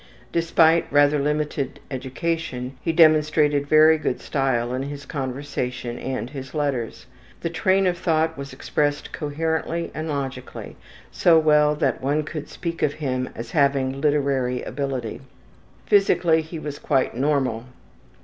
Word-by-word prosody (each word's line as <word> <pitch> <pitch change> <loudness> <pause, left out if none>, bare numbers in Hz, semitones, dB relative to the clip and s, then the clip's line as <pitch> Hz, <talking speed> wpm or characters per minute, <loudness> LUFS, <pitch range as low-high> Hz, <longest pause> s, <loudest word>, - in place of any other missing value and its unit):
Despite 165 0 +3
rather 145 +1 +4
limited 150 -1 -2
education 130 -1 -3
he 165 - 0
demonstrated 150 -3 +4
very 155 +1 +6
good 130 - -2
style 125 -3 -1
in 130 - -2
his 140 +1 -6
conversation 130 -3 -4
and 130 -3 -3
his 135 -1 -8
letters. 140 -6 -2 0.4
The 170 - -2
train 190 +2 +2
of 175 -1 0
thought 160 -1 +1
was 140 0 -7
expressed 145 +2 -2
coherently 160 +2 -2
and 155 +1 -4
logically, 135 -3 -5 0.4
so 170 -2 +4
well 150 -1 +4
that - - 0
one 145 +3 0
could 155 0 -6
speak 170 -2 -5
of 145 - +2
him 130 -4 -2
as 115 0 -7
having 140 -2 +1
literary 140 -4 +1
ability. 135 -6 -4 0.6
Physically 175 -5 +3
he 160 +1 -8
was 150 -2 -6
quite 135 -3 +1
normal. 130 -4 0
145 Hz, 135 wpm, -23 LUFS, 130-160 Hz, 0.6 s, very